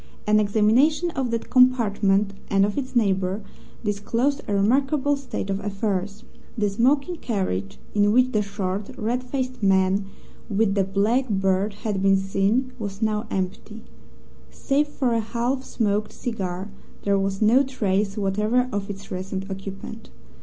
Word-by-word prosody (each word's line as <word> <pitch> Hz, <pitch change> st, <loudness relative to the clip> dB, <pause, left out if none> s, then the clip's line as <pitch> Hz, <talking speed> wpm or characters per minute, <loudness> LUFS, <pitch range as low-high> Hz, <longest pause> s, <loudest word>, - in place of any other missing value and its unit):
An 215 Hz, 0 st, +4 dB
examination 230 Hz, -, +3 dB
of 265 Hz, -5 st, -2 dB
that 230 Hz, -1 st, -3 dB
compartment, 210 Hz, -6 st, +3 dB, 0.2 s
and 195 Hz, 0 st, +4 dB
of 205 Hz, -, -3 dB
its 260 Hz, -2 st, -4 dB
neighbour, 195 Hz, -2 st, +1 dB, 0.4 s
disclosed 230 Hz, +7 st, 0 dB
a 205 Hz, -, -1 dB
remarkable 270 Hz, +7 st, +2 dB
state 265 Hz, -7 st, -4 dB
of 195 Hz, -, -1 dB
affairs. 200 Hz, 0 st, -2 dB, 0.3 s
The 205 Hz, -2 st, +1 dB
smoking 275 Hz, -, +2 dB
carriage 185 Hz, -, -2 dB, 0.2 s
in 205 Hz, 0 st, +3 dB
which 255 Hz, +3 st, +4 dB
the 215 Hz, -, +2 dB
short, 200 Hz, 0 st, -3 dB
red 240 Hz, +4 st, -1 dB
faced 255 Hz, -1 st, -3 dB
man 195 Hz, 0 st, +3 dB, 0.4 s
with 205 Hz, -1 st, +2 dB
the 195 Hz, -1 st, +2 dB
black 210 Hz, +7 st, +1 dB
beard 195 Hz, 0 st, +1 dB
had 205 Hz, -3 st, -1 dB
been 195 Hz, 0 st, +4 dB
seen 195 Hz, +7 st, 0 dB
was 200 Hz, 0 st, -4 dB
now 215 Hz, +1 st, 0 dB
empty. 195 Hz, +4 st, -4 dB, 0.7 s
Save 290 Hz, +2 st, 0 dB
for 260 Hz, -4 st, -1 dB
a 230 Hz, -, +2 dB
half 235 Hz, +4 st, -1 dB
smoked 210 Hz, -4 st, -1 dB
cigar, 190 Hz, -4 st, -4 dB, 0.3 s
there 200 Hz, -1 st, +2 dB
was 195 Hz, 0 st, -1 dB
no 225 Hz, +5 st, +5 dB
trace 205 Hz, -7 st, -1 dB
whatever 210 Hz, +5 st, +1 dB
of 200 Hz, -2 st, -3 dB
its 195 Hz, 0 st, -8 dB
recent 190 Hz, +1 st, -4 dB
occupant. 195 Hz, +3 st, -7 dB
210 Hz, 145 wpm, -24 LUFS, 195-245 Hz, 0.7 s, no